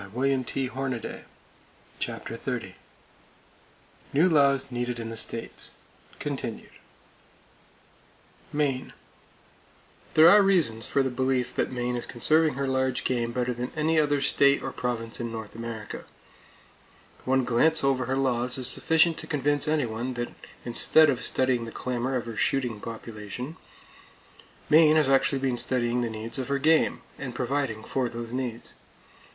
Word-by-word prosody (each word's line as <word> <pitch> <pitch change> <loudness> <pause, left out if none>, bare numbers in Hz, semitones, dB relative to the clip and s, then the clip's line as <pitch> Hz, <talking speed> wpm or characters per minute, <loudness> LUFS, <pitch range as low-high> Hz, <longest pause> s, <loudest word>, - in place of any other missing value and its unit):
[Page 130 +6 -1
283] 130 -2 -3 0.7
CHAPTER - - -4
XXX - - -4 1.4
NEW 160 +6 +4
LAWS 140 -4 +3
NEEDED 120 0 -2
IN 115 -1 -5
THE - - -6
STATES 115 +1 -3 0.4
(Continued) - - -5 1.8
Maine: 140 -3 -1 1.2
There 155 +1 +8
are 205 +4 +8
reasons 165 - +2
for 140 - +2
the 130 - -1
belief 130 0 0
that - - -1
Maine 125 -1 -2
is 120 - -4
conserving 155 +5 +2
her 140 0 -2
large 130 -1 0
game 120 -2 -1
better 125 +1 -1
than 120 +1 -4
any 160 +1 +2
other 145 -2 +2
state 140 0 +3
or 135 - -3
province 115 -3 -3
in 120 -1 -3
North 110 -2 -7
America. 115 -1 -7 1.2
One 130 0 +2
glance 155 +7 +2
over 135 -2 +2
her 130 +1 0
laws 125 -2 +2
is 130 - -2
sufficient 160 +5 +3
to 160 - -8
convince 145 0 +1
anyone 125 -5 -1
that 120 0 -4 0.3
instead 145 +5 +5
of 125 - -3
studying 130 -3 0
the 115 - -7
clamor 125 +2 -2
of 120 -3 -2
her 115 -1 -6
shooting 125 -3 0
population, 115 +5 -7 1.1
Maine 155 0 +6
has 155 -3 +3
actually 135 +1 +3
been 130 -2 -1
studying 125 -1 +1
the 120 - -1
needs 110 +3 -5
of 130 - -3
her 140 - 0
game, 160 +3 +3 0.2
and 125 -3 -6
providing 125 -4 -2
for 130 0 -1
those 115 0 -7
needs. 125 -3 -4
130 Hz, 145 wpm, -27 LUFS, 120-140 Hz, 1.8 s, There